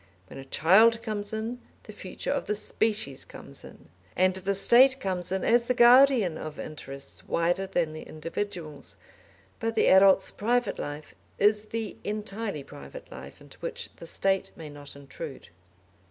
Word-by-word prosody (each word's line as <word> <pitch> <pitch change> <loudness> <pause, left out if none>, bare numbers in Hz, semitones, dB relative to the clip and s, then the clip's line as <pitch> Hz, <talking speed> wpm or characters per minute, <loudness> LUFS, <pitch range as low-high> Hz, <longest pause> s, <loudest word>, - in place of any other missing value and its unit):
When - - -9
a 135 - -9
child 220 +11 +4
comes 205 -2 -4
in, 225 +3 -4 0.2
the - - -11
future - - -5
of - - -2
the 210 - 0
species 210 -8 -1
comes - - -11
in; - - -14 0.3
and 185 +1 +3
the 190 +1 -2
State 260 +7 +5
comes 185 -5 -2
in 190 -1 -1
as 235 0 +4
the 250 - 0
guardian 240 - +6
of 155 -1 -7
interests 140 -3 -9
wider 175 +3 0
than 170 -4 -1
the 155 - -7
individual's; 165 -1 -6 0.6
but 225 0 -2
the - - +4
adult's 190 0 +6
private 240 +1 0
life 145 0 -6 0.2
is 210 +1 +3
the 225 0 -5
entirely 210 -5 -4
private 145 - -12
life - - -11
into - - -15
which 480 -1 -6
the 170 - -10
State 195 +2 0
may 155 -2 -9
not 145 -1 -11
intrude. 140 +1 -9
195 Hz, 160 wpm, -27 LUFS, 160-225 Hz, 0.6 s, guardian